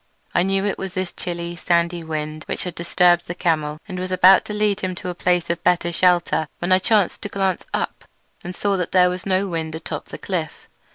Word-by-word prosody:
I - - +3
knew 195 +2 +1
it 205 - -1
was 190 -1 -5
this 185 -1 -3
chilly, 170 -1 -4
sandy 170 0 0
wind 155 -1 -4
which - - -2
had 180 - -4
disturbed 175 0 +2
the 175 - -4
camel, 155 -4 0
and 185 -3 -5
was 185 0 -4
about 185 +1 +6
to - - -6
lead 210 -1 +1
him 185 -2 -3
to 185 0 -5
a - - -3
place 175 0 +1
of 170 - -4
better 175 -1 +2
shelter 175 -3 +2
when 175 +2 -3
I 185 - +6
chanced 205 -1 +2
to 205 - -4
glance 190 -2 -1
up - - -3 0.4
and 180 +1 -6
saw 200 +1 0
that 180 -2 -3
there 180 -1 +5
was 180 +2 -5
no 190 +1 +1
wind 160 -3 -3
atop 160 - -5
the - - -9
cliff. 170 -5 -4
180 Hz, 225 wpm, -22 LUFS, 170-185 Hz, 0.4 s, about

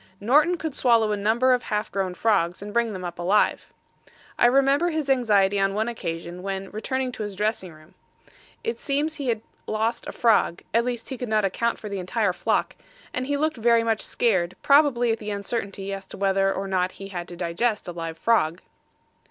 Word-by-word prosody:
Norton 300 - +3
could 315 -3 -4
swallow 230 -5 +3
a - - +1
number 225 +5 +3
of 250 - +1
half 210 -2 -2
grown 185 -1 -2
frogs 190 -4 +1
and 205 0 -7
bring 235 -1 +1
them 185 -3 -6
up 175 0 -6
alive. 190 +5 +1 0.6
I 240 - +5
remember 275 +6 +3
his 310 -4 -1
anxiety 205 -6 +3
on 195 0 +1
one 220 +2 0
occasion 170 -6 -5
when 195 0 -4
returning 260 +4 -2
to 245 - -8
his 205 -2 -4
dressing 205 -3 -2
room; 155 +1 -18 0.7
it 460 - -3
seems 300 +2 -1
he 280 -3 -4
had 225 -3 0 0.3
lost 225 +2 -1
a - - -4
frog 220 -7 +2
at 230 +1 +3
least 245 -2 -4
he 265 -3 -6
could 250 - -4
not 215 -2 +2
account 230 +5 0
for 215 - -8
the 200 -1 -4
entire 185 +1 0
flock - - 0 0.4
and 255 0 -2
he 285 0 0
looked 310 -1 0
very 230 0 +3
much 225 -2 0
scared, 185 -7 0
probably 275 -5 +4
at 225 - -1
the 210 - -6
uncertainty 200 -1 -4
as 195 -1 -7
to - - -10
whether 195 0 +2
or 195 0 -3
not 185 -1 0
he 195 0 -9
had 175 -2 -5
to 175 - -9
digest 185 +6 -1
a - - -3
live 165 -1 -6
frog. 175 -6 +2
215 Hz, 205 wpm, -25 LUFS, 195-245 Hz, 0.7 s, I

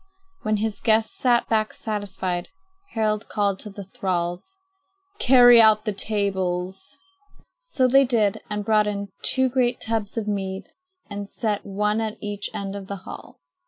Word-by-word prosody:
When 215 0 0
the 215 0 -2
guests 220 - +3
sat 245 -9 +2
back 215 -1 0
satisfied, 190 -4 -3 0.4
Harald 215 -1 -1
called 200 -2 0
to 210 - -7
the 200 0 -9
thralls: 185 - -3 0.6
"Carry 245 -2 +7
out 215 0 +5
the 210 - -1
tables." 195 +3 -2 0.6
So 290 - +1
they 270 +2 +5
did 220 -5 +1
and 210 -1 -3
brought 215 -1 +3
in 200 -1 -3
two 260 0 +4
great 250 -1 +1
tubs 220 -1 -2
of 220 -2 -2
mead 195 -2 -3 0.4
and 205 -1 -6
set 210 -4 -2
one 210 +2 0
at 220 -1 -3
each 205 -1 -3
end 195 0 -5
of 195 -1 -7
the 200 - -4
hall. - - -11
210 Hz, 155 wpm, -23 LUFS, 200-225 Hz, 0.6 s, Carry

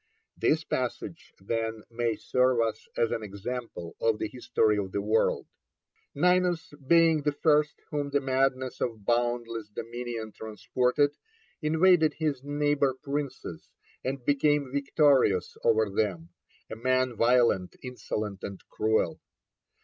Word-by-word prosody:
This - - +1
passage, - - -4
then, 110 +2 -3
may 115 -1 0
serve 125 -1 +2
us 110 -1 -1
as 115 - +2
an - - -1
example 105 -3 -6
of 115 -1 +2
the 110 - -2
History 120 -3 +1
of 95 -2 -4
the - - 0
World: 110 +2 +1 0.7
Ninus 180 0 +2
being 165 -1 +5
the 150 +1 +1
first 150 0 +2 0.2
whom 145 -1 -2
the 140 0 +2
madness 130 -1 0
of 110 -4 -3
boundless 120 -2 -1
dominion 115 0 -5
transported, 125 +7 0 0.5
invaded 160 +1 +4
his 150 -5 -1
neighbour 145 -2 +1
princes, 140 +1 -5 0.3
and 130 -1 -4
became 145 -1 +2
victorious 140 - +3
over 110 -1 +3
them; 95 -5 -2 0.4
a - - -4
man 130 +1 +1
violent, 115 -5 +3
insolent, 110 -5 -4
and 100 -1 -7
cruel. 110 0 0
125 Hz, 125 wpm, -28 LUFS, 110-145 Hz, 0.7 s, being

